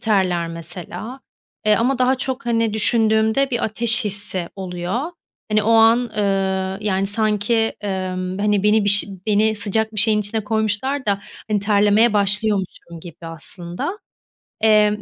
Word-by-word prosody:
terler 185 -6 0
mesela. 175 +9 -8 0.4
E, 215 0 +4
ama 250 +4 0
daha 255 +1 +3
çok, 260 -1 -4
hani, 230 -2 0
düşündüğümde 220 +4 +2
bir 240 - -1
ateş 225 +2 +2
hissi 200 -3 -2
oluyor. 180 +3 -4 0.5
Hani, 215 0 +2
o 220 - 0
an, 225 +1 +6
ııı, 195 -4 -1
yani, 195 -2 0
sanki, 215 +1 0
ımm, 185 -1 -3
hani, 205 -1 +1
beni 210 0 +3
bir - - +1
şey 200 0 +4 0.2
beni 215 +1 +2
sıcak 220 +2 0
bir 210 - +2
şeyin 215 0 +3
içine 210 +1 -3
koymuşlar 220 +5 -1
da, 200 -1 0 0.3
hani, 210 -1 +1
terlemeye 210 +2 +3
başlıyormuşum 200 -4 0
gibi 170 0 -11
aslında. 175 - -4 0.6
Emm, 210 -1 +3
210 Hz, 145 wpm, -20 LUFS, 195-225 Hz, 0.6 s, an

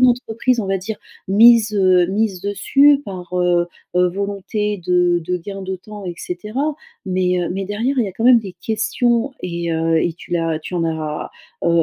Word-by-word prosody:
d'entreprises 245 -1 +2
on 205 - -4
va 195 0 +1
dire 210 +3 -6 0.3
misent, 220 +2 +6
heu 185 -3 +4
mises 195 -2 -1
dessus 275 +8 +4
par 180 -2 -8
heu 175 -1 +2 0.3
heu, 180 0 +4
volonté 200 +2 -2
de 180 -1 +3
de 180 +2 -2
gain 195 +3 -7
de 190 0 -4
temps 205 +2 -10
et 175 -1 -4
cetera, 215 - -3 0.3
mais 180 -1 +1
heu 175 - -2
mais 195 +1 -3
derrière 225 +8 -1
il 240 - +3
y - - -3
a 190 - -8
quand 225 - -4
même 250 -1 +7
des 195 -4 -9
questions 235 +3 0
et, 170 -1 -3
heu 165 0 +1
et 170 - 0
tu - - -15
l'as 165 -2 0
tu 180 - -7
en 170 -1 0
as, 155 -2 -3 0.3
heu 170 0 +4
195 Hz, 200 wpm, -19 LUFS, 175-220 Hz, 0.3 s, même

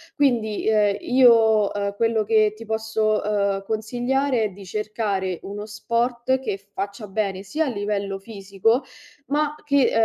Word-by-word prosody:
Quindi 235 -8 +1
ehm, 210 -2 +3
io, 225 -5 +5
uhm, 200 0 -2
quello 225 0 +1
che 215 -1 +3
ti 230 +1 -10
posso, 220 -1 0
uhm, 200 -2 0
consigliare, 245 +4 0
è 215 - 0
di 195 +1 -12
cercare 200 -2 -2
uno 205 +1 -6
sport 235 +4 0
che 255 -7 -3 0.2
faccia 200 +2 -5
bene 195 -1 -2
sia 305 +11 -1
a - - -1
livello 200 -3 -2
fisico 200 +4 -1 0.4
ma 300 +1 0
che, 280 -3 +3
215 Hz, 145 wpm, -23 LUFS, 200-235 Hz, 0.4 s, io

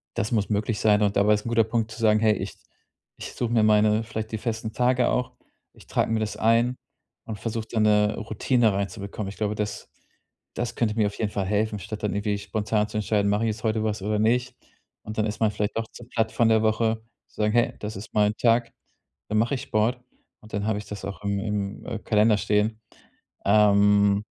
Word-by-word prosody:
das 105 - -2
muss 105 -2 +1
möglich 105 +1 -1
sein. 105 -1 +3
Und 100 0 +1
dabei 105 +1 +4
ist 105 0 -1
'n 115 - -2
guter 115 -1 +4
Punkt 110 0 -1
zu 110 - -9
sagen: 110 -1 +4
„Hey, 110 -1 +4
ich - - -5 0.6
ich - - -8
suche 120 -2 -2
mir 115 - +4
meine 105 0 +4
vielleicht 110 0 -5
die 110 - 0
festen 110 -1 -3
Tage 125 +1 +2
auch. 125 - -1 0.4
Ich - - -18
trage - - 0
mir 115 - +1
das 110 -1 -3
ein 115 +3 +2 0.5
und 110 -3 -6
versuche 115 +1 -4
da 115 - 0
'ne 105 -1 +3
Routine 110 +1 +1
reinzubekommen." 100 +1 -4
Ich 100 - -10
glaube, 105 -1 -1
das 105 -1 -4 0.7
das 120 0 -3
könnte 110 -3 0
mir 110 -2 +2
auf 100 - -7
jeden 105 -2 -1
Fall 100 -2 -2
helfen, 105 +2 0
statt 105 +3 -7
dann 105 - 0
irgendwie 105 0 -1
spontan 105 +1 -1
zu - - -4
entscheiden, 105 -1 +1
mache 105 +2 +1
ich 115 - +1
jetzt 110 0 -5
heute 110 -1 0
was 105 -1 -2
oder 105 +2 -1
nicht? 125 +3 +1 0.5
Und 110 +1 -8
dann 110 - +2
ist 105 -1 -4
man 110 - +4
vielleicht 105 +1 -2
auch 115 -1 -2
zu 120 - -11
platt 110 -2 0
von 115 -1 +3
der 110 -1 +4
Woche 110 0 +1 0.2
zu - - -28
sagen: 105 0 +2
„Hey, 120 0 +2
das 105 +1 -5
ist 100 +3 -9
mein 105 0 +2
Tag, 115 0 +2 0.6
da 110 - -1
mache 115 +5 +2
ich 130 - -5
Sport." 120 0 0 0.4
Und 110 - -16
dann 100 0 -1
habe 110 -2 0
ich 105 - -9
das 100 -2 -7
auch 100 +1 -7
im 100 0 -1
im, 105 -1 -3
äh, 110 - -4
Kalender 105 0 +3
stehen. 105 +2 0 0.6
Ähm. 100 0 +4
110 Hz, 225 wpm, -25 LUFS, 105-115 Hz, 0.7 s, dabei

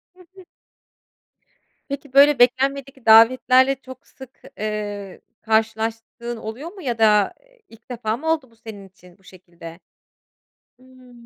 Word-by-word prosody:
Hı - - -25 0.2
hı. 375 -2 -15 1.4
Peki, 280 -1 -7
böyle 280 0 +5
beklenmedik 265 +1 0
davetlerle 255 +4 +5
çok 260 -1 -14
sık, 265 -1 -16 0.2
eee, 205 -2 -6 0.2
karşılaştığın 225 +2 -2
oluyor 240 +10 -8
mu 390 -1 -13
ya 245 -5 -3
da, 210 -2 +3
eee, - - -30
ilk 230 +2 -20
defa 225 -2 -3
mı 320 +2 -2
oldu 300 -6 -2
bu - - -25
senin 220 -3 -12
için 180 -1 -21
bu 195 - -30
şekilde? 170 -2 -14 1.0
Hıı. 255 -1 -19
235 Hz, 135 wpm, -21 LUFS, 215-265 Hz, 1.4 s, böyle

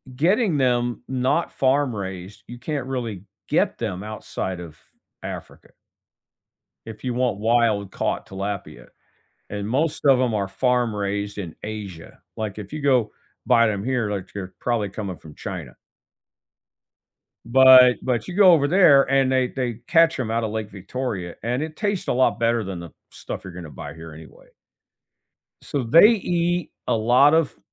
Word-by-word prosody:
getting 180 - +2
them 120 -2 0
not 130 +6 0
farm-raised, 105 -9 -1
you 120 0 -10
can't 140 -1 -4
really 115 -8 -4 0.2
get - - +1
them 100 -4 -4
outside 95 -4 -5
of 80 -3 -10 0.5
Africa - - -8 1.2
if 110 -1 -10
you 125 - -2
want 120 -4 0
wild-caught 110 -3 0
tilapia, 95 -4 -6 0.6
and 100 0 -4
most 145 +6 -1
of 135 -2 +6
them 125 -2 +1
are 100 -2 0
farm-raised 105 -4 -1
in 90 -6 -6
Asia. 105 -6 -8 0.2
Like, 110 -2 -4
if 100 -2 -9
you 155 - -4
go 130 -6 +2 0.3
buy 115 -2 +4
them 105 -2 -2
here, 125 -4 0
like, 100 -3 -4
they're 95 -2 -7
probably 115 -4 -1
coming 95 -2 -6
from 75 -2 -14
China. - - -7 1.7
But 130 0 +7
but 120 -4 -1
you 180 - -7
go 195 -2 +7
over 150 -4 +4
there 165 -6 +6
and 135 -1 +3
they 130 -1 +2
they 125 -3 -3
catch 165 -2 +4
'em 120 -4 -2
outta 115 0 0
Lake 110 -1 -4
Victoria 100 -2 -5
and 125 +5 -1
it 155 0 -6
tastes 205 -3 -2
a - - +2
lot 120 -4 +2
better 115 -1 +1
than 95 -3 -6
the 85 -3 -9 0.2
stuff - - -8
you're 95 - -8
gonna 85 -4 -9
buy 75 +1 -9
here 80 -1 -10
anyway. 80 +1 -14 1.2
So, 140 - -3
they 165 - +7
eat 175 -6 0 0.2
a - - +1
lot 125 +7 +4
of 160 -3 +1
115 Hz, 155 wpm, -23 LUFS, 100-135 Hz, 1.7 s, But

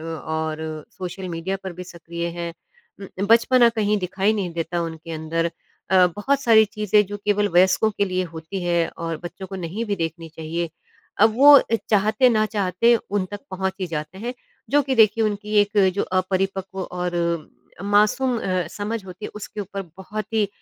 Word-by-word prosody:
और 160 -1 -4
social 185 +1 -6
media 170 +3 -3
पर 190 - -4
भी 180 +1 -8
सक्रिय 170 -1 -6
हैं। 170 0 -3 0.5
उम, 195 0 -5
बचपना 235 +2 +5
कहीं 210 -2 +1
दिखाई 190 +3 0
नहीं 195 -5 -2
देता 170 +1 -2
उनके 165 0 -6
अंदर 165 +1 -1 0.4
अ, 185 -1 +6
बहुत 275 +7 +1
सारी 225 -3 +6
चीज़ें 210 -1 +2
जो 205 +2 -5
केवल 205 0 +2
वयस्कों 185 +4 +4
के 200 - +3
लिए 185 -1 -1
होती 165 +4 -5
हैं 170 -1 +1 0.2
और 165 -1 -2
बच्चों 180 +2 -7
को 195 - -7
नहीं 185 +5 -4
भी 205 -3 -2
देखनी 165 -1 -4
चाहिए, 165 +1 -3 0.5
अब 220 +1 +5
वो 285 +3 +9
अ, 230 - 0
चाहते 215 +4 +4
ना 215 -2 +2
चाहते 200 +4 +3
उन 205 -3 -2
तक 205 - -5
पहुँच 190 0 -2
ही 185 - -1
जाते 155 +2 -5
हैं 240 +4 -4 0.4
जो 290 +2 +4
कि 270 -1 -1
देखिए, 220 0 +5
उनकी 210 0 -2
एक 205 +1 -2 0.2
जो 200 - 0 0.2
अपरिपक्व 190 0 -2
और 180 -1 -3 0.7
मासूम 215 +5 +2
अ, 185 -3 -1
समझ 210 +1 -4
होती 185 +3 -9
है, - - -9
उसके 210 0 -7
ऊपर 200 0 -5 0.2
बहुत 210 +3 -6
ही 210 -3 +2
190 Hz, 180 wpm, -23 LUFS, 170-210 Hz, 0.7 s, वो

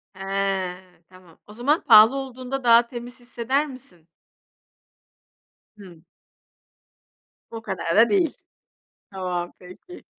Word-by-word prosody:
He. 195 -1 -2 0.3
Tamam, 185 -3 -19
o 210 - -13
zaman 280 +8 0
pahalı 225 +3 +7
olduğunda 260 0 -6
daha 235 0 +5
temiz 245 +1 -9
hisseder 255 +4 -2
misin? 180 - -11 1.7
Hımm. 175 -5 -15 1.5
O 225 - -7
kadar 190 -5 -3
da 230 +2 +6
değil! 355 -7 +1 0.8
Tamam, 180 -2 -4
peki. 185 - -14
225 Hz, 100 wpm, -23 LUFS, 185-255 Hz, 1.7 s, pahalı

